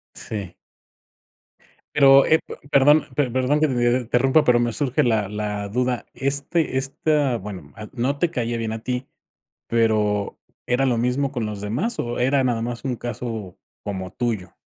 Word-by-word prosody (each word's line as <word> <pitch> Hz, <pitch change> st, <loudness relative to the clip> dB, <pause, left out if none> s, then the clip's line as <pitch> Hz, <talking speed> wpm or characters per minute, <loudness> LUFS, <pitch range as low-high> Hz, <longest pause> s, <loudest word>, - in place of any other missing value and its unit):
Sí. 100 Hz, -5 st, -6 dB, 1.4 s
Pero, 135 Hz, -1 st, +7 dB
eh, 160 Hz, -, +4 dB
p -, -, -7 dB, 0.2 s
perdón, 145 Hz, +2 st, +5 dB
pe 140 Hz, -3 st, +1 dB
perdón 130 Hz, +4 st, +1 dB
que 155 Hz, -, +3 dB
te 120 Hz, -1 st, +2 dB
interrumpa, 130 Hz, +5 st, +3 dB
pero, 125 Hz, -1 st, +4 dB
me 120 Hz, 0 st, 0 dB
surge 135 Hz, 0 st, +1 dB
la 110 Hz, -5 st, +1 dB
la 105 Hz, -1 st, -3 dB
duda. 125 Hz, +2 st, -1 dB
Este 140 Hz, +1 st, 0 dB
esta 140 Hz, 0 st, 0 dB
bueno, 95 Hz, -8 st, -8 dB
ah, 110 Hz, 0 st, -8 dB
no 135 Hz, +3 st, -1 dB
te 175 Hz, -, +1 dB
caía 120 Hz, -6 st, -2 dB
bien 115 Hz, -1 st, -3 dB
a 110 Hz, -, -3 dB
ti. 125 Hz, +1 st, -3 dB, 0.6 s
Pero, 105 Hz, -3 st, +1 dB, 0.3 s
¿era 125 Hz, +2 st, +1 dB
lo 125 Hz, -3 st, +1 dB
mismo 125 Hz, +4 st, 0 dB
con 120 Hz, -5 st, -2 dB
los 105 Hz, -2 st, -5 dB
demás, 120 Hz, -, -2 dB
o 120 Hz, 0 st, -3 dB
era 135 Hz, +2 st, +2 dB
nada 120 Hz, -3 st, 0 dB
más 120 Hz, 0 st, -4 dB
un 130 Hz, -3 st, -2 dB
caso, 115 Hz, -5 st, -5 dB, 0.3 s
como 95 Hz, -3 st, -5 dB
tuyo? 105 Hz, -5 st, -3 dB
120 Hz, 170 wpm, -23 LUFS, 110-135 Hz, 1.4 s, Pero